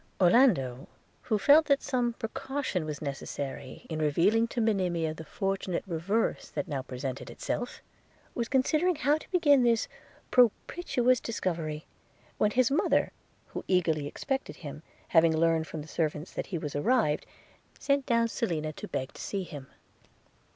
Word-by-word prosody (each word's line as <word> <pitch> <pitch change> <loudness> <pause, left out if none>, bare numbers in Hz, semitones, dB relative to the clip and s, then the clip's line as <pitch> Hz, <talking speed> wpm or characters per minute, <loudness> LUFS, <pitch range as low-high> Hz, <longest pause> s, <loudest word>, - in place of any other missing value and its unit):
Orlando, 175 - +4 0.3
who 220 - 0
felt 290 +10 +6
that 280 -1 +3
some 245 -2 0
precaution 260 - -3
was 150 -1 -5
necessary, 140 -1 -5
in 160 -1 -4
revealing 180 +10 +3
to 235 - -4
Monimia 180 -8 +1
the 160 - -9
fortunate 195 0 -2
reverse 195 +5 -1
that 145 - -4
now 140 -3 -2
presented 130 0 -5
itself, 245 - -4 0.5
was 235 -1 -2
considering 310 +7 +2
how 295 +1 +2
to - - -15
begin 295 -7 +4
this 235 -2 +2 0.4
propitious 250 +1 +3
discovery, 165 -8 -3 0.5
when 210 - +4
his 250 +3 +2
mother, 290 - +2 0.4
who - - -6
eagerly 160 -6 +1
expected 270 - -3
him, 145 +1 -7 0.3
having 165 -1 +4
learned 165 -1 +2
from 155 -2 -6
the - - -13
servants 155 0 -2
that - - -4
he 180 - -3
was 150 -3 -5
arrived, 200 - +1 0.5
sent 280 -1 0
down 230 -1 +3
Selina 160 -9 -2
to - - -8
beg 130 0 -4
to - - -10
see 195 -2 -3
him. 145 -6 -9
190 Hz, 150 wpm, -29 LUFS, 155-245 Hz, 0.5 s, felt